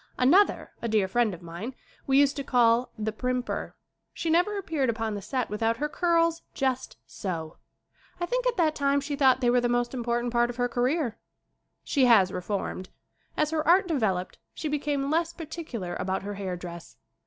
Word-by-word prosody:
Another, 345 +11 +4
a 235 - -2
dear 215 -3 +2
friend 235 +2 +2
of 175 -1 -9
mine, 175 +10 -6 0.3
we 270 0 +4
used 285 -1 +4
to 280 - -2
call 240 -2 +3
"The 215 0 -2
Primper." 250 +2 -3 0.4
She 330 - -1
never 360 +5 +2
appeared 315 -9 -1
upon 225 -1 -1
the 205 - -4
set 255 +4 -2
without 225 +2 0
her 295 +4 -1
curls 335 0 +1
just 260 -1 -1
so. 165 -4 -5 0.6
I 350 - 0
think - - -1
at - - 0
that 320 -3 +3
time 280 -1 +2
she 285 +1 -3
thought 265 -2 +4
they 240 -1 +3
were 245 0 +3
the 240 - +1
most 240 +1 0
im 250 -2 -3
portant 240 0 -1
part 240 0 +3
of 245 - -5
her 245 0 +1
career. 245 0 0 0.6
She 270 -3 +2
has 205 -6 +6
reformed. 185 0 -4 0.5
As 305 0 +1
her 310 -1 -1
art 365 +2 +5
developed 205 - -1 0.2
she 315 - -3
became 290 -1 -1
less 330 +1 +1
particular 305 - -6
about 190 +1 -2
her 205 +1 -4
hair 190 -3 -4
dress. 170 -1 -9
250 Hz, 190 wpm, -27 LUFS, 215-300 Hz, 0.6 s, has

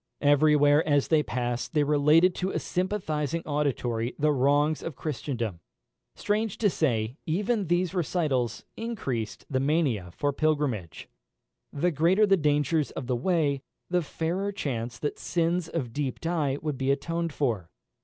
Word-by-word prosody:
Every 145 +1 +5
where 145 +1 +5
as 145 -2 +2
they 155 -2 +4
passed 125 +1 -3
they 150 - +4
related 150 +5 +4
to 185 +2 -2
a - - -2
sympathising 170 -5 -2
auditory 125 -5 -1
the 150 +1 +2
wrongs 145 +3 +2
of 165 - -5
Christendom. 120 - -3 0.6
Strange 215 0 -1
to 205 -4 +2
say, 120 -6 0
even 200 +4 0
these 175 +1 +1
recitals 150 - -1
increased 135 - -4
the 130 - 0
mania 135 - +1
for 145 +11 -1
pilgrimage. 135 - -1 0.6
The 175 +5 0
greater 170 +8 +4
the 195 -1 +5
dangers 150 -1 +1
of - - -6
the 125 0 0
way, 145 -1 +1 0.3
the 180 0 +3
fairer 175 +6 -2
chance 120 - -4
that 145 +7 -3
sins 170 0 0
of 135 -9 -4
deep 140 -2 -2
dye 155 -5 0
would 150 -4 -3
be 135 0 0
atoned 165 +4 -1
for. 115 - -1
150 Hz, 150 wpm, -27 LUFS, 130-170 Hz, 0.6 s, Every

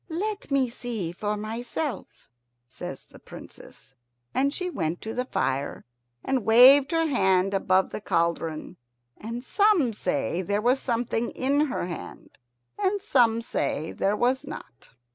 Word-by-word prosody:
"Let 405 +5 -3
me 275 -2 +2
see 235 -7 -4
for 210 +4 -3
myself," 235 +6 -5 0.4
says - - -8
the - - -17
Princess, - - -13 0.4
and 275 +2 +2
she 365 +4 -3
went 170 - -2
to 220 - -5
the 250 - -2
fire 140 - -2 0.4
and 265 -3 0
waved 260 +5 +7
her 330 0 +2
hand 190 -8 +2
above 190 -1 +2
the - - -5
cauldron. 165 -4 -1 0.4
And 230 +3 -6
some 370 - +3
say 175 - -1
there 200 +3 -1
was 245 +5 +2
something 235 -1 -1
in 285 +3 +1
her 255 - -3
hand, 175 -2 -9 0.4
and 405 0 +1
some 240 - +2
say 160 -7 -2
there 200 +2 0
was 255 +4 +1
not. 275 - -10
235 Hz, 145 wpm, -26 LUFS, 190-275 Hz, 0.4 s, waved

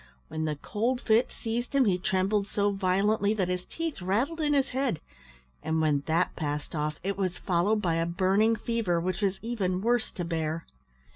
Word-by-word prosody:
When 160 0 -2
the 155 -1 -1
cold 230 - -1
fit 225 +1 +3
seized 240 +4 -3
him 270 -2 +5
he 185 -4 +2
trembled 195 +2 +1
so 205 0 +1
violently 200 +2 +2
that 190 -4 0
his 180 0 -2
teeth 325 - -4
rattled 240 - 0
in 295 -1 +2
his 275 -1 +2
head; 255 - -1 0.6
and 160 0 0
when 150 -3 +2
that 165 +3 +1
passed 150 -2 -3
off 150 0 -2
it 200 +1 -2
was 185 -2 -1
followed 195 +5 +1
by 165 -2 +1
a 165 0 0
burning 195 +6 +3
fever, 220 -7 0
which 185 +3 -2
was 195 -1 +1
even 195 -6 -1
worse 235 +1 +1
to 175 - -3
bear. 165 -1 -2
195 Hz, 190 wpm, -28 LUFS, 170-225 Hz, 0.6 s, him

